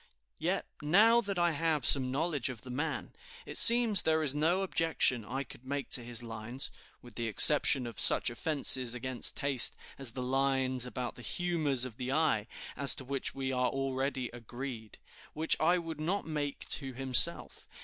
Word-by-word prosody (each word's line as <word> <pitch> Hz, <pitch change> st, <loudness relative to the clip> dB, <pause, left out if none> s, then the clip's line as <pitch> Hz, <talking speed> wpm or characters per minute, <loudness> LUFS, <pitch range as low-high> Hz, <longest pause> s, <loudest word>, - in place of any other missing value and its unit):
"Yet, -, -, -3 dB, 0.2 s
now 215 Hz, +10 st, +3 dB
that 200 Hz, -4 st, -6 dB
I 175 Hz, -1 st, 0 dB
have 155 Hz, -1 st, -2 dB
some 130 Hz, -2 st, +4 dB
knowledge 145 Hz, -1 st, -3 dB
of 120 Hz, -4 st, -9 dB
the 125 Hz, -, -11 dB
man, 145 Hz, +6 st, -5 dB, 0.3 s
it -, -, -10 dB
seems 230 Hz, -4 st, +6 dB
there 160 Hz, 0 st, -1 dB
is 140 Hz, -3 st, -1 dB
no 165 Hz, +6 st, -1 dB
objection 165 Hz, -, 0 dB
I 130 Hz, +6 st, -6 dB
could 125 Hz, -, -15 dB
make 140 Hz, 0 st, -6 dB
to 120 Hz, -, +1 dB
his 120 Hz, 0 st, -1 dB
lines 115 Hz, +4 st, -6 dB, 0.3 s
(with 120 Hz, -2 st, -15 dB
the 115 Hz, +2 st, -5 dB
exception 135 Hz, +3 st, +7 dB
of 115 Hz, -, -9 dB
such -, -, +5 dB
offenses 130 Hz, -2 st, +2 dB
against 125 Hz, 0 st, +4 dB
taste 140 Hz, -3 st, 0 dB, 0.2 s
as 130 Hz, -4 st, -4 dB
the 125 Hz, -, -6 dB
lines 130 Hz, -1 st, -2 dB
about 125 Hz, +1 st, -7 dB
the -, -, -12 dB
humors 150 Hz, -2 st, -1 dB
of 120 Hz, -3 st, -11 dB
the 125 Hz, +1 st, -6 dB
eye, 135 Hz, -8 st, -1 dB, 0.3 s
as 140 Hz, +1 st, +4 dB
to 130 Hz, -, -7 dB
which 140 Hz, +1 st, -5 dB
we 135 Hz, -1 st, -5 dB
are 125 Hz, -1 st, -1 dB
already 135 Hz, -1 st, -4 dB
agreed), 120 Hz, -1 st, -10 dB, 0.4 s
which 160 Hz, +1 st, 0 dB
I 175 Hz, +3 st, +1 dB
would 165 Hz, -3 st, -8 dB
not 185 Hz, +6 st, -3 dB
make 150 Hz, -3 st, -6 dB
to 135 Hz, -2 st, -2 dB
himself. 130 Hz, -3 st, 0 dB
135 Hz, 180 wpm, -29 LUFS, 125-155 Hz, 0.4 s, exception